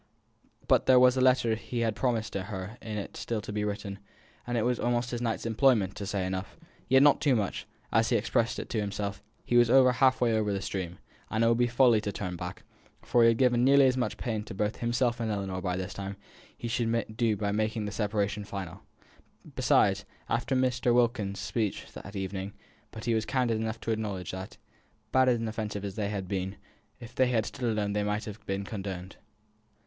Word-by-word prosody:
But - - +3
there 130 -1 +7
was 125 0 +6
the 130 - 0
letter 125 -3 +4
he 115 +2 -4
had 110 -2 0
promised 115 -4 -1
her 95 +2 -5
in 110 -1 -5
it 100 - -6
still 115 -2 -3
to 105 - -7
be 105 0 -1
written; 100 -1 -4 0.5
and 120 0 -1
it 110 - +1
was 125 0 +1
almost 120 0 0
his 120 -1 -3
night's 115 -2 -2
employment 115 -4 +3
to 100 - -5
say 100 -2 -1
enough, 95 +1 -4 0.3
yet 130 +2 +6
not 145 -1 +5
too 140 -4 +3
much; 105 -4 -2 0.2
for, - - +2
as 115 0 +3
he 120 - +2
expressed 115 +1 +1
it - - -5
to 110 - 0
himself, 100 -1 -3 0.2
he 120 - +2
was 120 0 +6
half 130 +1 +5
way 120 -2 +2
over 110 -2 +1
the 100 - -1
stream, 90 -3 -4 0.3
and 110 +1 +1
it - - +4
would 115 +1 +3
be 120 - +4
folly 120 -2 +4
to 105 - -3
turn 90 -2 -4
back, 90 +4 -7 0.4
for 120 - +3
he 115 - +7
had 115 -1 +4
given 125 -1 +3
nearly 140 +1 +6
as 130 -1 +3
much 125 -1 -1
pain 110 -3 -2
both 105 +1 -2
to - - -16
himself 120 0 0
and 115 -1 -1
Ellinor 95 -2 -3
by 90 -1 -1
this 95 0 -4
time 100 0 -5
as - - -17 0.4
he 120 - -5
should 115 -2 -1
do 110 -2 +1
by 100 0 -1
making 110 +1 -1
the 105 - -4
separation 105 -1 -1
final. 95 -2 -7 0.7
Besides, - - +3 0.2
after 120 +3 0
Mr. 125 -2 +2
Wilkins's 115 -5 +1
speeches 110 -4 -2
that 100 +1 -10
evening 95 +1 -4 0.4
but 110 - -9
he 120 - +2
was 110 -1 0
candid 125 -4 +1
enough 110 0 -3
to 115 - -2
acknowledge 100 -5 -3
that, 95 +1 -7 0.5
bad 130 0 +4
and 115 -2 +1
offensive 110 -2 -4
as 100 - -4
they 100 -1 -2
had 100 -3 -4
been, 95 0 -3 0.4
if 120 -1 -11
they 130 - +3
had 115 -3 +1
stood 120 -2 -3
alone 105 -2 -1
they 105 - 0
might 105 +1 -1
have 105 0 -8
been 95 0 -2
condoned. 95 -3 -6
110 Hz, 215 wpm, -29 LUFS, 100-120 Hz, 0.7 s, there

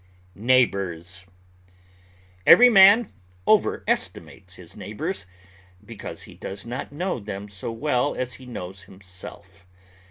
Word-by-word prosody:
NEIGHBORS 95 -6 0 1.2
Every 245 +1 +9
man 200 +1 +7 0.3
overestimates - - 0
his - - -12
neighbors, 100 -1 -5 0.6
because 115 -1 -8
he - - -12
does 100 +2 -8
not 120 +3 -6
know 175 0 -3
them 100 -1 -7
so 100 +2 -6
well 130 +3 0
as 125 0 -3
he 130 - -12
knows 95 -5 -8
himself. 95 -1 -12
115 Hz, 105 wpm, -24 LUFS, 95-130 Hz, 1.2 s, Every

